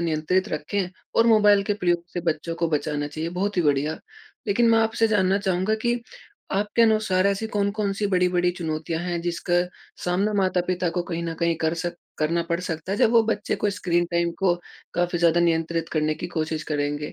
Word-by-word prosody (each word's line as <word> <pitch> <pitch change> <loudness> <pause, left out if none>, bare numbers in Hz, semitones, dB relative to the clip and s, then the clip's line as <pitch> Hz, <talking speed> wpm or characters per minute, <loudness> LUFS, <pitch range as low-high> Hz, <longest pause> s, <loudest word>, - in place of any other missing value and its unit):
नियंत्रित 170 +3 0
रखें 175 +5 -2 0.3
और 230 - +4
मोबाइल 210 -3 +5
के 205 - +3
प्रयोग 175 -3 0
से 175 - -2
बच्चों 160 +2 -4
को 170 -1 -1
बचाना 150 -1 -1
चाहिए। 155 +3 -4
बहुत 195 +3 -2
ही 175 - +3
बढ़िया! 150 +1 +1 0.5
लेकिन 230 +3 +3
मैं 225 - +5
आपसे 225 0 +2
जानना 195 -2 +2
चाहूँगा 190 +2 0
कि 240 0 +1 0.5
आपके 205 +4 +2
अनुसार 215 -4 +3
ऐसी 200 +2 0
कौन-कौन 205 0 0
सी 205 - +1
बड़ी-बड़ी 180 -2 +2
चुनौतियाँ 160 -1 -3
हैं 175 -1 -2
जिसका 175 0 -1 0.5
सामना 190 +4 +1
माता-पिता 180 -1 0
को 175 - +1
कहीं 170 -1 -4
न 165 -1 -3
कहीं 170 0 +1
कर 160 +1 +1
सक 175 +1 -3 0.2
करना 165 +2 +1
पड़ 170 -1 0
सकता 180 +1 -4
है। 205 - -2
जब - - +4
वो 230 -1 +5
बच्चे 210 -2 -1
को 205 - 0
स्क्रीन 175 -3 0
टाइम 170 0 +1
को 190 -3 +3 0.4
काफ़ी 175 0 0
ज़्यादा 170 0 +4
नियंत्रित 165 -1 0
करने 155 -1 +1
की 175 - -5
कोशिश 155 -1 -2
करेंगे? 145 0 -2
175 Hz, 195 wpm, -24 LUFS, 165-200 Hz, 0.5 s, मोबाइल